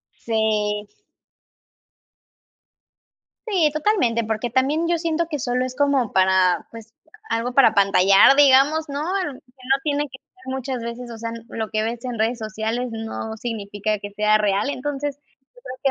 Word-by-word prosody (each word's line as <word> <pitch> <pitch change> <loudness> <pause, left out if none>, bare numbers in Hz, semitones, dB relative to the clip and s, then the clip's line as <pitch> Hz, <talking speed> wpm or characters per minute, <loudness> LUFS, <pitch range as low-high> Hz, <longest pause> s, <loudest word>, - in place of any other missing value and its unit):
Sí. 210 -2 -1 2.6
Sí, 345 -8 +2
totalmente, 305 - +1
porque 220 +2 -2
también 280 +7 +1
yo 340 -1 +1
siento 330 0 -1
que 300 -3 -4
solo 250 +1 -1
es 255 0 -7
como 280 -5 +1
para, 185 -2 +3
pues, 225 0 -12 0.4
algo 235 +2 -1
para 275 -1 +6
apantallar, 195 +5 +5
digamos, 290 +3 +5
¿no?, 280 0 -3
aunque 350 -4 -3
no 260 +2 -2
tiene 290 -1 0
que 260 0 -13
ser 375 0 -26
muchas 265 -2 -4
veces, 235 +1 -6
o 225 - -8
sea, 230 0 -5 0.2
lo 220 -1 -5
que 215 -1 -1
ves 235 +2 -4
en 245 -3 -4
redes 230 +2 +1
sociales 220 +3 -3
no 225 0 -5
significa 215 -2 -3
que 205 0 -8
sea 210 +1 +3
real. 205 +4 0
Entonces, 285 +1 -3
yo 290 - -41 0.3
creo 255 - -8
245 Hz, 155 wpm, -22 LUFS, 215-280 Hz, 2.6 s, para